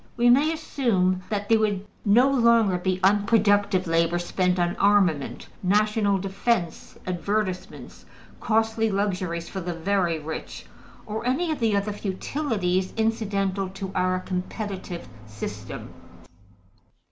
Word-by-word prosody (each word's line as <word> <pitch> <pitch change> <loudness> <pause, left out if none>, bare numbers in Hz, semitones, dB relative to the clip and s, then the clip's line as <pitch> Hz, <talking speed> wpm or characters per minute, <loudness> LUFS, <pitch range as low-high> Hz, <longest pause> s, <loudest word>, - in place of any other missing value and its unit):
We 240 0 +5
may 290 +6 +4
assume 225 - 0
that 205 -1 -2
there 225 0 +4
would 205 -2 0 0.2
no 235 +6 +5
longer 235 -8 +3
be 185 0 -1
unproductive 205 -1 +3
labor 165 +1 +2
spent 180 +1 0
on 175 -1 0
armaments, 195 -8 +2 0.2
national 205 +1 +2
defense, 195 -1 -2
advertisements, 185 +1 -3 0.3
costly 225 0 +1
luxuries 185 -4 -2
for 190 - -5
the 175 -1 -4
very 175 -1 0
rich, 155 +1 -7 0.4
or 215 +1 -4
any 315 +7 +1
of 310 - -3
the 220 -4 +2
other 200 +1 -1
futilities 195 -2 -2
incidental 200 -4 0
to 195 0 -6
our 185 0 +1
competitive 185 0 -5 0.2
system. 105 -1 -7
200 Hz, 120 wpm, -25 LUFS, 180-220 Hz, 0.4 s, We